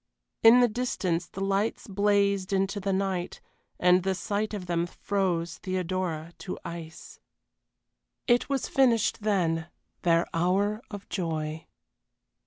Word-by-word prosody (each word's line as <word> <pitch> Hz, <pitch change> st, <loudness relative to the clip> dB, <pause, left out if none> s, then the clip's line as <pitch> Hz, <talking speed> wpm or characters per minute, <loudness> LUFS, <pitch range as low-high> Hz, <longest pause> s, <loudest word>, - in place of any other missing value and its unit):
In 230 Hz, +2 st, +8 dB
the 245 Hz, -, +6 dB
distance 190 Hz, -7 st, -1 dB
the 195 Hz, -, -8 dB
lights 200 Hz, +3 st, 0 dB
blazed 200 Hz, -1 st, +1 dB
into 195 Hz, +1 st, 0 dB
the 195 Hz, 0 st, -1 dB
night, 190 Hz, -2 st, -1 dB, 0.4 s
and 180 Hz, +1 st, +5 dB
the 190 Hz, +1 st, 0 dB
sight 205 Hz, +3 st, -2 dB
of 205 Hz, -4 st, -5 dB
them 170 Hz, -1 st, 0 dB
froze 180 Hz, -3 st, -2 dB
Theodora 185 Hz, -3 st, -3 dB
to 185 Hz, -, -5 dB
ice. 170 Hz, -1 st, -8 dB, 1.1 s
It 240 Hz, +2 st, +3 dB
was 275 Hz, -2 st, 0 dB
finished 235 Hz, -6 st, +2 dB
then 170 Hz, -6 st, +1 dB, 0.3 s
their 170 Hz, -1 st, +3 dB
hour 195 Hz, +6 st, +1 dB
of 205 Hz, -4 st, -8 dB
joy. 160 Hz, -3 st, -3 dB
190 Hz, 125 wpm, -28 LUFS, 170-205 Hz, 1.1 s, In